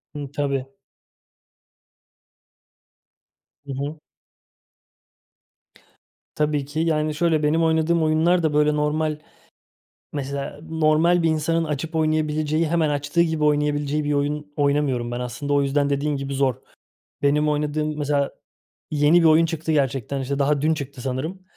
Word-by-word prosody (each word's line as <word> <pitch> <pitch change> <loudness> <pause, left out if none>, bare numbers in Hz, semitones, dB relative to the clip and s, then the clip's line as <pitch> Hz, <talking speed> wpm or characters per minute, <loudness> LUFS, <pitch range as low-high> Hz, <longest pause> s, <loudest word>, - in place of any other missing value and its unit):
Hı, 145 -2 -6
tabii. 140 -2 -1 3.0
Hı 140 - -5
hı. 145 +4 -4 2.4
Tabii 150 -2 0
ki. 145 +3 -5
Yani 155 -2 0
şöyle, 160 -1 +1
benim 160 +3 +2
oynadığım 160 +1 +2
oyunlar 165 +3 +2
da 155 -2 +1
böyle 150 0 +3
normal, 150 +1 0 1.0
mesela 140 0 -4
normal 160 +2 +3
bir 165 - +3
insanın 160 +1 +1
açıp 155 +1 -4
oynayabileceği, 155 0 +1
hemen 160 -1 +1
açtığı 145 +3 0
gibi 160 -2 0
oynayabileceği 150 0 +1
bir 145 0 0
oyun 145 +1 -2
oynamıyorum 140 -4 0
ben. 120 - -3
Aslında 125 +4 -3
o 145 - +3
yüzden 140 +1 +1
dediğin 145 +1 0
gibi 140 0 -4
zor. 135 -2 +1 0.7
Benim 150 +1 +2
oynadığım 150 +1 -1
mesela 145 -1 0 0.6
yeni 150 +3 +4
bir - - +1
oyun 160 +1 +5
çıktı 160 0 -3
gerçekten. 135 -2 0
İşte 140 +1 -3
daha 140 0 +1
dün 160 +1 +3
çıktı 140 -3 -7
sanırım, 135 +9 -4
150 Hz, 130 wpm, -23 LUFS, 140-155 Hz, 3.0 s, oyun